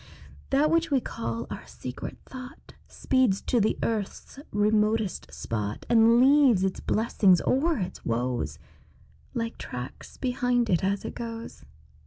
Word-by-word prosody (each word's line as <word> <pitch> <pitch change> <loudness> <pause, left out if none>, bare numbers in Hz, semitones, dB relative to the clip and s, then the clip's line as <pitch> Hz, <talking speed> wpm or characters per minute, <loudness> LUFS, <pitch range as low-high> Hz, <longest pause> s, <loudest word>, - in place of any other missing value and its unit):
That 290 +3 +3
which 330 0 +2
we 275 -2 +3
call 115 - -4
our - - -7
secret 125 0 -7
thought 255 0 -11
Speeds 255 -7 +1
to 240 - +1
the 215 - +1
earth's 220 +4 -3
remotest 210 -1 +1
spot, 105 -2 -4
And 230 0 +6
leaves 265 -6 +5
its 190 -1 -1
blessings 205 -5 +3
or 310 +4 +2
its 185 -2 -5
woes 120 - -1 0.8
Like 230 -1 -3
tracks 125 +1 -7
behind 245 -2 0
it 175 - +2
as 195 +1 0
it - - -4
goes. 230 - -7
225 Hz, 135 wpm, -27 LUFS, 185-250 Hz, 0.8 s, And